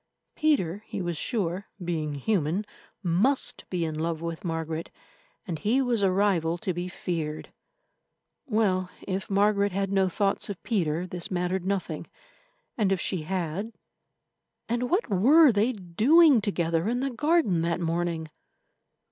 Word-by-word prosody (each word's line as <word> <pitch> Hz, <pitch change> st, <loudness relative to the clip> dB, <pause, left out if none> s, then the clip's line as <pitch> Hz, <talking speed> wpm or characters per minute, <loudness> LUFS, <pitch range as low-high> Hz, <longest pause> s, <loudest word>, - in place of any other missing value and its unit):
Peter, 210 Hz, -, +1 dB
he -, -, -5 dB
was 175 Hz, -2 st, -2 dB
sure, 190 Hz, 0 st, -2 dB, 0.2 s
being 155 Hz, -4 st, -2 dB
human, 180 Hz, +4 st, 0 dB, 0.4 s
must 195 Hz, +11 st, +1 dB
be 175 Hz, -3 st, -1 dB
in 160 Hz, -, -3 dB
love 160 Hz, +1 st, -2 dB
with 165 Hz, 0 st, -5 dB
Margaret, 165 Hz, -1 st, -3 dB, 0.6 s
and 165 Hz, -5 st, -4 dB
he 225 Hz, -, +2 dB
was 245 Hz, -5 st, +1 dB
a 195 Hz, -2 st, +3 dB
rival 185 Hz, -4 st, +2 dB
to 185 Hz, +2 st, -2 dB
be 175 Hz, +1 st, -3 dB
feared. 165 Hz, -4 st, -4 dB, 0.9 s
Well, 195 Hz, -6 st, +1 dB, 0.2 s
if 190 Hz, +2 st, -3 dB
Margaret 200 Hz, 0 st, +2 dB
had 195 Hz, 0 st, -1 dB
no 190 Hz, -1 st, +3 dB
thoughts 195 Hz, +3 st, 0 dB
of 200 Hz, -, -6 dB
Peter, 175 Hz, -6 st, 0 dB
this 180 Hz, -1 st, -5 dB
mattered 180 Hz, 0 st, -1 dB
nothing, 195 Hz, -1 st, -2 dB, 0.7 s
and 200 Hz, -3 st, +2 dB
if 190 Hz, -, +1 dB
she 185 Hz, -2 st, -1 dB
had—and 195 Hz, +7 st, -6 dB
what 385 Hz, +7 st, +1 dB
were 270 Hz, -, +6 dB
they 215 Hz, +3 st, +2 dB
doing 245 Hz, -, +4 dB
together 170 Hz, -3 st, 0 dB
in 245 Hz, +1 st, 0 dB
the 275 Hz, 0 st, -1 dB
garden 295 Hz, -, +2 dB
that 170 Hz, +1 st, 0 dB
morning? 165 Hz, -2 st, -2 dB
185 Hz, 140 wpm, -27 LUFS, 170-215 Hz, 0.9 s, were